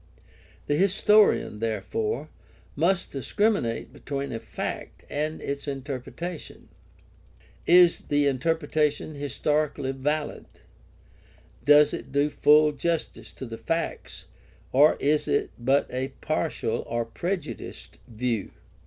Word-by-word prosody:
The 145 - +1
historian, 200 - +4
therefore, 110 +5 -2 0.5
must 175 +5 +1
discriminate 135 - 0
between 140 -1 -4
a 115 - -3
fact 110 -3 -6
and 155 +2 -2
its 140 +1 -4
inter 135 -1 -4
pretation. 170 +5 -8 1.0
Is 175 0 +6
the 145 0 +2
interpretation 150 +2 0
historically 145 0 -1
valid? 145 +3 -2 1.2
Does 145 +2 +6
it - - -6
do 145 +2 +2
full 150 +1 +5
justice 160 +3 -3
to 130 - -7
the 115 -2 -8
facts, 165 +9 -3 0.5
or 145 +4 +6
is 150 +2 +1
it 420 -1 0
but 135 +4 +2
a 130 +1 -2
partial - - -1
or 120 0 -1
prejudiced 175 +11 -5
view 115 -2 -2
145 Hz, 110 wpm, -26 LUFS, 130-155 Hz, 1.2 s, Is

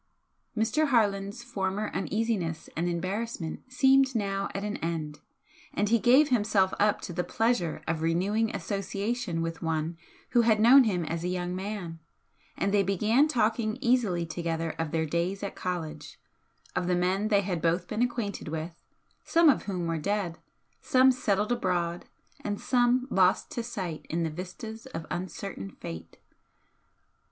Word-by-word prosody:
Mr. 275 +8 +2
Harland's 205 -3 +1
former 205 -3 -2
uneasiness 195 -3 -2
and 175 +2 0
embarrassment 185 0 -3
seemed 265 0 +4
now 200 -2 -1
at 195 - -2
an 210 0 -2
end, 160 -3 -3 0.6
and 205 - +1
he 230 +1 +4
gave 265 +7 +5
himself 205 -5 +2
up 210 0 +3
to 175 - -6
the 180 +1 -1
pleasure 185 -2 0
of 165 -1 -1
renewing 195 +7 +1
association 195 0 -2
with 165 0 -4
one 160 0 -1 0.4
who 240 - +5
had 220 -2 +3
known 250 +4 +8
him 180 -6 0
as 165 +1 -3
a - - -1
young 180 0 -2
man, 185 -4 -5 0.6
and 200 - 0
they 205 - +5
began 215 - +3
talking 225 -5 +1
easily 235 -10 +2
together 165 0 -2
of 165 -1 -1
their 160 0 0
days 170 +5 -1
at 200 - -3
college, 165 -4 -5 0.6
of 175 - 0
the 180 - +2
men 185 +4 +1
they 205 -2 +3
had 180 -4 -2
both 170 +2 +1
been 220 - -2
acquainted 235 -7 -2
with, 160 +2 -5 0.4
some 335 -1 +5
of 280 - +2
whom 185 -4 -2
were 165 -1 -1
dead, 195 -1 -2 0.4
some 260 0 +5
settled 210 -4 0
abroad 175 -7 -1 0.4
and 205 -1 -2
some 250 0 +2
lost 185 -1 +3
to 235 - -2
sight 190 -9 -5
in 170 +1 0
the 160 - -1
vistas 220 +8 -7
of 165 -11 -6
uncertain 175 - -5
fate. 80 0 -8
195 Hz, 155 wpm, -28 LUFS, 170-225 Hz, 0.6 s, known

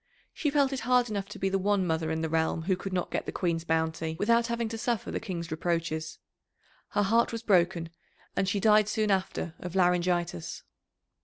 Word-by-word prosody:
She 300 - 0
felt 280 -1 +2
it 265 - -2
hard 245 -1 +2
enough 200 -2 -3
to - - -8
be 195 - 0
the 195 0 +1
one 200 0 +2
mother 160 -1 0
in 160 0 -1
the 160 - 0
realm 160 0 0
who 185 +2 +1
could 190 +1 -6
not 180 -1 -2
get - - -2
the - - -2
Queen's 170 -3 -1
bounty, 160 -1 -1
without 235 +4 +3
having 235 -1 -1
to 225 - -4
suffer 235 -1 -1
the - - -2
King's 170 -6 -5
reproaches. 160 -1 -2 0.8
Her 205 - +3
heart 230 +4 +3
was 230 0 -5
broken, 175 -5 +2 0.4
and 195 - +1
she 200 - 0
died 210 0 +5
soon 215 -1 +1
after 185 -3 -1
of 180 0 -7
laryngitis. 175 - +1
185 Hz, 205 wpm, -29 LUFS, 165-215 Hz, 0.8 s, died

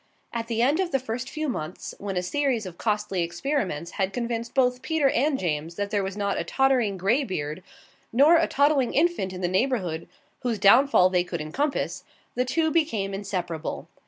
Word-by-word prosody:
At 230 -1 -3
the 230 0 0
end 285 +7 +3
of 375 -2 +1
the 270 - +2
first 250 0 -5
few 310 +2 -3
months, 175 - -5
when 195 -2 -4
a 180 - 0
series 260 0 0
of 175 -2 -9
costly 210 -4 0
experiments 175 - -2
had 195 -1 -1
convinced 235 0 -3
both 250 -1 +2
Peter 310 -3 +2
and 280 +2 +1
James 165 - -2
that 205 +1 -3
there 205 - +1
was 190 +1 -4
not 200 -1 -1
a - - -1
tottering 245 -1 +2
grey 215 +10 +2
beard 155 - -4 0.5
nor 290 +8 +6
a 330 - +2
toddling 280 -2 +2
infant 310 - +1
in 185 0 -7
the 175 - +1
neighbourhood 185 -5 -1 0.3
whose 240 -3 -1
downfall 205 -2 +5
they 180 -1 +3
could 175 -1 -5
encompass, 275 - -2 0.3
the 250 - 0
two 315 +5 +1
became 230 -13 0
inseparable. 180 -5 -4
225 Hz, 190 wpm, -25 LUFS, 185-270 Hz, 0.5 s, nor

